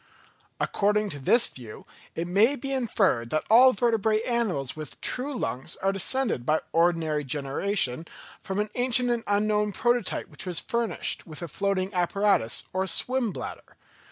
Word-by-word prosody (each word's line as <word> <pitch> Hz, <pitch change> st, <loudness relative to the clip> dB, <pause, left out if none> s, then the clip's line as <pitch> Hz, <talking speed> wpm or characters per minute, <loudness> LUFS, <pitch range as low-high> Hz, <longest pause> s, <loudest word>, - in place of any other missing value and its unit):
According 210 Hz, 0 st, +1 dB
to 145 Hz, -, -5 dB
this 230 Hz, -, +4 dB
view 120 Hz, -4 st, -9 dB, 0.3 s
it 165 Hz, +1 st, -3 dB
may 210 Hz, +10 st, +3 dB
be 275 Hz, +1 st, -6 dB
inferred 200 Hz, -, +1 dB
that 155 Hz, -, 0 dB
all 255 Hz, +3 st, +8 dB
vertebrate 220 Hz, -1 st, +1 dB
animals 215 Hz, -, -1 dB
with 155 Hz, -2 st, -8 dB
true 260 Hz, +3 st, -2 dB
lungs 130 Hz, -, -3 dB
are 195 Hz, -, 0 dB
descended 200 Hz, -, 0 dB
by 155 Hz, +5 st, +1 dB
ordinary 165 Hz, -3 st, +1 dB
generation 145 Hz, +2 st, -1 dB, 0.3 s
from 190 Hz, -2 st, -5 dB
an 210 Hz, 0 st, -1 dB
ancient 250 Hz, 0 st, +2 dB
and 235 Hz, -1 st, -1 dB
unknown 210 Hz, 0 st, +1 dB
prototype 240 Hz, -1 st, 0 dB
which -, -, -4 dB
was 175 Hz, -2 st, 0 dB
furnished 235 Hz, -3 st, -2 dB
with 155 Hz, +1 st, -7 dB
a -, -, -4 dB
floating 195 Hz, +3 st, -1 dB
apparatus 180 Hz, -, +1 dB
or 190 Hz, +1 st, -1 dB
swim 245 Hz, +5 st, +1 dB
bladder. -, -, -8 dB
200 Hz, 155 wpm, -26 LUFS, 165-235 Hz, 0.3 s, all